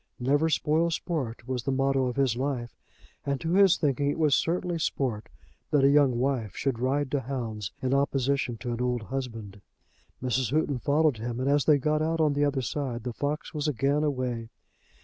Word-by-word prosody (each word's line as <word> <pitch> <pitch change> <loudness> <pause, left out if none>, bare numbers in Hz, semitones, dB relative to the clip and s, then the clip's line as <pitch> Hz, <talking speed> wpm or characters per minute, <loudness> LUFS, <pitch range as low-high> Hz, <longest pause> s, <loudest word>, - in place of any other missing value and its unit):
"Never 145 +6 +2
spoil 160 +2 +2
sport," 145 -8 -3
was 130 -1 -2
the 135 - -2
motto 135 0 +1
of 125 - -3
his 135 -4 +2
life, 125 -2 -3 0.5
and 140 -1 -1
to 165 +1 -2
his 195 -2 +6
thinking 140 -1 +1
it - - -2
was 155 -3 +3
certainly 175 +2 0
sport 125 -8 -2 0.4
that 145 -2 +3
a 140 - +6
young 140 -4 +4
wife 125 -5 -1
should 135 -4 -1
ride 135 +2 0
to 145 - +1
hounds 115 -6 -4
in 130 0 +1
opposition 140 -2 0
to 125 - -3
an 120 - -3
old 125 -2 -1
husband. 115 -6 -6 0.6
Mrs. 125 -1 0
Houghton 145 -2 0
followed 145 0 +2
him, 120 +2 -4
and 130 - -1
as 145 0 +3
they 150 -2 +5
got 150 +2 0
out 165 +1 0
on 155 -2 +3
the 145 +1 +1
other 140 -2 0
side, 125 -3 -3
the 125 -1 -4
fox 145 +4 -3
was 150 -1 -2
again 140 +2 +1
away. 125 -6 -2
135 Hz, 195 wpm, -27 LUFS, 125-145 Hz, 0.6 s, his